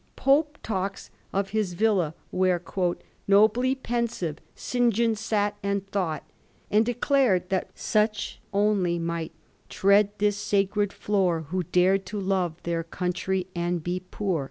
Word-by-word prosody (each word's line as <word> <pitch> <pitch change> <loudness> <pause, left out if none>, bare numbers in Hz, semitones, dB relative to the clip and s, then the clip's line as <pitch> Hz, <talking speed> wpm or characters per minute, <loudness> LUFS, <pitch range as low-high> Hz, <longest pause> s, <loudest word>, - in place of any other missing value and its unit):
Pope 295 +2 +2
talks 195 -2 -3 0.2
of 195 0 -1
his 210 -4 0
villa 180 -5 +1 0.2
where, 185 -1 +2 0.4
* - - -32
nobly 220 +6 +4
pensive, 235 - -2 0.2
St. 245 -1 +1
John 230 +1 +2
sat 210 -1 0
and 200 0 -1
thought/ 165 -7 -1 0.5
and 210 +1 +5
declared 245 -6 +2
that 190 -1 -1
such 215 -1 0
only 200 -4 +2
might 170 -1 -3 0.4
Tread 200 +1 +4
this 205 0 +1
sacred 205 0 +1
floor, 190 -7 0
Who 185 +2 0
dare 180 +3 +3
to 195 +2 -6
lore 185 -4 0
their 170 -1 -1
country 180 +2 -2
and 175 -1 -1
be 180 +2 -2
poor. 185 -1 -2
195 Hz, 135 wpm, -26 LUFS, 180-215 Hz, 0.5 s, and